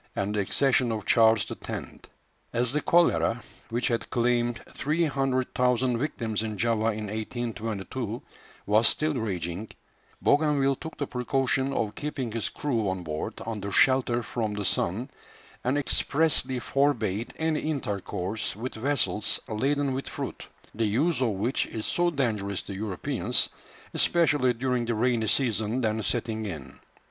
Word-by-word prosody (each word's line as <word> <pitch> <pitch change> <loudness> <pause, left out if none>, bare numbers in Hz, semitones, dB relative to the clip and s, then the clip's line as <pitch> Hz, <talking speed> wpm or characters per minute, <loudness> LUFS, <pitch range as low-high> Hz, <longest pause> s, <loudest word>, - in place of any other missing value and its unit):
and 100 +1 -1
the 105 - 0
accession 125 +4 +2
of 110 -1 -3
Charles 110 -2 +5
X. - - -5 0.7
As 120 +1 +1
the 150 - +1
cholera, 165 -9 +3 0.3
which 120 +1 0
had 115 -1 -1
claimed 120 -1 +1
300,000 130 -5 +1
victims 115 -6 -2
in 110 -2 -3
Java 115 0 +1
in 105 0 -4
1822, 110 +1 -4 0.5
was 110 +2 +5
still 155 0 +2
raging, 100 -4 -3 0.5
Bougainville 145 -2 +3
took 160 -1 -8
the 145 - -1
precaution 130 +1 0
of 110 -6 -1
keeping 140 -4 -4
his 115 -1 -1
crew 115 -9 -1
on 95 -1 -3
board 75 -1 -4
under 105 -3 -4
shelter 125 0 +3
from 110 -3 -2
the 105 -1 -3
sun, 105 +10 0 0.5
and 130 +3 +1
expressly 145 -1 +2
forbade 120 -5 0
any 160 -1 +1
intercourse 105 - -2
with 120 +5 -5
vessels 110 -5 +1
laden 135 +5 0
with 135 +1 -4
fruit, - - -6 0.3
the 115 +1 0
use 140 +8 +1
of 125 - +3
which 110 +6 0
is 110 -1 -5
so 175 0 +2
dangerous 105 - -1
to - - -7
Europeans, 95 -2 0 0.4
especially 150 -7 +3
during 125 0 0
the 115 0 -1
rainy 115 -1 +1
season 110 -1 +1
then 110 -1 0
setting 110 -1 -1
in. 80 -8 -7
120 Hz, 140 wpm, -27 LUFS, 110-135 Hz, 0.7 s, Charles